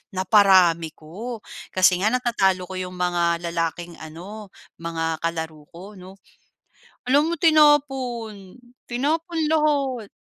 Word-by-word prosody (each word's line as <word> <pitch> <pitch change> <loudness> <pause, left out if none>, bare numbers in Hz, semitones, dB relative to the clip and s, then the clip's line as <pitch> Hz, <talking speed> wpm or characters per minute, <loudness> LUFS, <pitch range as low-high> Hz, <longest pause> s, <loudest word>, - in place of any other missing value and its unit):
Naparami 185 -4 +4
ko, 215 +10 -7 0.4
kasi 185 -1 +4
nga 210 - +3
natatalo 220 -7 +1
ko 190 - -10
yung 185 0 -6
mga 175 -1 +1
lalaking 170 +1 -3
ano, 185 +7 -9 0.3
mga 165 -1 -3
kalaro 160 -2 -4
ko, 185 +5 -12
'no? 185 +1 -12 0.9
Alam 290 +5 +3
mo - - 0
tinapon 270 - +2 0.3
tinapon 320 +7 -1
lahat. 285 -7 0
195 Hz, 110 wpm, -23 LUFS, 170-255 Hz, 0.9 s, Naparami